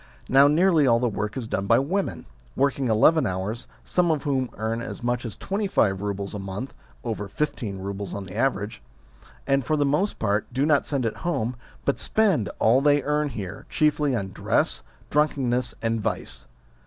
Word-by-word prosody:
Now, 135 Hz, +2 st, +6 dB
nearly 160 Hz, -1 st, +4 dB
all 115 Hz, -1 st, +5 dB
the 125 Hz, -, +1 dB
work 105 Hz, +1 st, -3 dB
is 125 Hz, -, -3 dB
done 100 Hz, -3 st, -2 dB
by -, -, +5 dB
women, 185 Hz, +9 st, -1 dB, 0.3 s
working 135 Hz, -1 st, +1 dB
eleven 135 Hz, +9 st, +4 dB
hours, 95 Hz, +5 st, -3 dB, 0.2 s
some 180 Hz, -1 st, +1 dB
of 155 Hz, -3 st, +1 dB
whom 130 Hz, -3 st, 0 dB
earn 110 Hz, +2 st, -2 dB
as 120 Hz, -, -7 dB
much 120 Hz, 0 st, -1 dB
as 110 Hz, -4 st, -5 dB
twenty 200 Hz, +1 st, -2 dB
five 95 Hz, -, +2 dB
roubles 100 Hz, -1 st, -3 dB
a 105 Hz, -, -4 dB
month 95 Hz, +7 st, -5 dB, 0.3 s
(over 105 Hz, -4 st, -3 dB
fifteen 110 Hz, -3 st, -3 dB
roubles 100 Hz, 0 st, -5 dB
on 100 Hz, -1 st, -5 dB
the 95 Hz, -, -10 dB
average), 105 Hz, -, -1 dB, 0.6 s
and, 135 Hz, -1 st, +2 dB
for 155 Hz, +3 st, 0 dB
the 145 Hz, -, +2 dB
most 150 Hz, +9 st, +1 dB
part, 105 Hz, +1 st, 0 dB
do 135 Hz, +2 st, +1 dB
not 150 Hz, -2 st, +3 dB
send 135 Hz, -4 st, 0 dB
it 115 Hz, -, -2 dB
home, 125 Hz, -9 st, -1 dB, 0.3 s
but 140 Hz, -, +1 dB
spend 195 Hz, -, +2 dB
all 120 Hz, +5 st, +4 dB
they 145 Hz, -1 st, +4 dB
earn 150 Hz, 0 st, +1 dB
here, 100 Hz, -6 st, -7 dB
chiefly 150 Hz, -3 st, +2 dB
on 100 Hz, -4 st, -2 dB
dress, -, -, 0 dB, 0.3 s
drunkenness, 130 Hz, -4 st, +1 dB
and 115 Hz, -1 st, 0 dB
vice. -, -, -4 dB
125 Hz, 185 wpm, -25 LUFS, 105-145 Hz, 0.6 s, Now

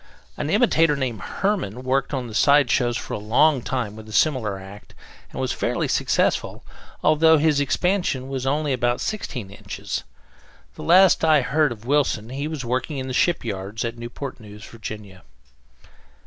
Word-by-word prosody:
An 145 Hz, -, -3 dB
imitator, 165 Hz, -, +3 dB
named 125 Hz, -7 st, -3 dB
Herman, 175 Hz, -, -2 dB
worked 130 Hz, +1 st, 0 dB
the 125 Hz, -5 st, -4 dB
side 140 Hz, +1 st, +4 dB
shows 120 Hz, -2 st, +1 dB
for -, -, -6 dB
a -, -, -3 dB
long 125 Hz, +7 st, +3 dB
time 120 Hz, -5 st, -3 dB
with 110 Hz, 0 st, -11 dB
a -, -, -9 dB
similar 115 Hz, -6 st, +1 dB
act, 95 Hz, +2 st, -12 dB, 0.4 s
and -, -, -7 dB
was -, -, -1 dB
fairly -, -, -1 dB
successful, -, -, 0 dB, 0.4 s
although 160 Hz, +1 st, +5 dB
his 150 Hz, -1 st, +2 dB
expansion 145 Hz, -2 st, 0 dB
was 135 Hz, -1 st, -4 dB
only 145 Hz, 0 st, 0 dB
about 120 Hz, -1 st, 0 dB
sixteen 125 Hz, -, -4 dB
inches. 100 Hz, -, -6 dB, 0.7 s
The -, -, -11 dB
last 185 Hz, +2 st, +5 dB
time 160 Hz, -, +2 dB
I 155 Hz, -2 st, +5 dB
heard 150 Hz, +1 st, +2 dB
of 115 Hz, -1 st, -9 dB
Wilson, 130 Hz, -5 st, +1 dB
he 140 Hz, +3 st, -4 dB
was 155 Hz, -5 st, -5 dB
working 130 Hz, +5 st, -2 dB
in 130 Hz, -, -3 dB
the 130 Hz, -, -4 dB
shipyards 110 Hz, -, -1 dB
at 115 Hz, 0 st, -3 dB
Newport 125 Hz, +3 st, -7 dB
News, 105 Hz, -1 st, -12 dB
Virginia. 105 Hz, -4 st, -9 dB
130 Hz, 165 wpm, -23 LUFS, 110-150 Hz, 0.7 s, although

